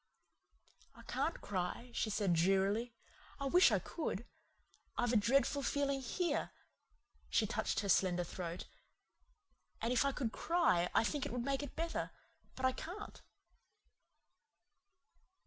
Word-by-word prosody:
"I - - -13
can't 330 - -2
cry," 200 +5 -3
she 220 - 0
said 205 -3 +1
drearily. 195 +7 +2 0.4
"I 275 - -2
wish 355 +7 +6
I - - +4
could. 240 - -4 0.7
I've 245 0 +1
a - - +3
dreadful 270 +6 +3
feeling 280 -1 0
here 345 +8 -1 0.4
" - - -36
she - - +3
touched - - -1
her 200 - -3
slender 180 -1 +3
throat 175 0 -5 1.1
"and 235 +2 0
if 250 - +4
I 280 - +2
could 255 -5 -2
cry 200 - +2
I - - +5
think 285 +3 -1
it - - -7
would 245 0 -2
make 275 0 0
it 285 - -7
better. 330 +1 -2 0.5
But 260 - -2
I 260 - +5
can't." 360 +10 -7
245 Hz, 140 wpm, -36 LUFS, 195-280 Hz, 1.1 s, wish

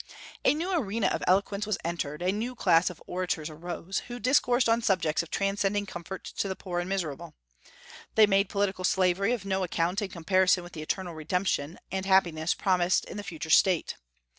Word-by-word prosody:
A - - +4
new 345 +5 -2
arena 230 - 0
of - - -2
eloquence 200 +2 +1
was 215 - 0
entered; 165 -2 -3
a 185 - +2
new 230 +5 -3
class 180 -6 +3
of 180 - -10
orators 180 -3 -3
arose, 175 +4 -4
who 240 0 -6
discoursed 250 0 +3
on 230 +1 +3
subjects 170 -8 +1
of 170 - -10
transcending 200 +1 0
comfort 180 0 -7
to - - -3
the 190 - -3
poor 180 -2 -4
and 175 +1 -3
miserable. 170 -8 -4 0.8
They 220 - +8
made 195 -1 +2
political 200 -2 -1
slavery 185 +3 +2
of 235 -5 -2
no 190 -1 0
account 175 +2 0
in 200 - -3
comparison 185 +1 +2
with 175 - -12
the 155 - -6
eternal 175 +3 -3
redemption 160 -1 -1
and 190 0 -3
happiness 175 -4 +3
promised 180 -1 +2
in - - -8
the 205 - -5
future 160 -4 -6
state. 180 -2 +4
190 Hz, 190 wpm, -28 LUFS, 175-200 Hz, 0.8 s, They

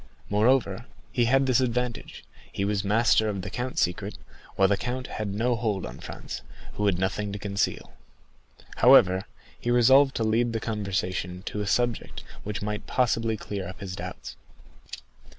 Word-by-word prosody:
Moreover, 115 0 +2 0.2
he 120 - +2
had 135 +3 +3
this 130 -2 +3
advantage, 125 -1 -2 0.3
he 100 - -2
was 100 -1 0
master 110 +1 +3
of 100 -3 -3
the 100 - -6
count's 125 +4 -1
secret, 90 -1 -3 0.4
while 95 - +4
the 100 - +3
count 125 +4 -4
had 105 -4 -4
no 120 +5 +1
hold 110 -5 -1
on 60 - -8
Franz, - - -7 0.3
who 105 - 0
had 95 -3 +2
nothing 100 +2 -1
to 100 - -4
conceal. 100 -8 -2 0.8
However, 95 +1 +6 0.3
he 120 - -3
resolved 130 +3 +5
to 115 - 0
lead 115 +2 +1
the 115 - -1
conversation 95 -4 -3
to 105 - -4
a 105 - -3
subject 120 +2 -1 0.2
which 105 0 -4
might 105 +1 -4
possibly 115 -3 +1
clear 100 -4 -5
up 95 - -9
his 95 -2 -6
doubts. - - -7
105 Hz, 165 wpm, -26 LUFS, 100-120 Hz, 0.8 s, However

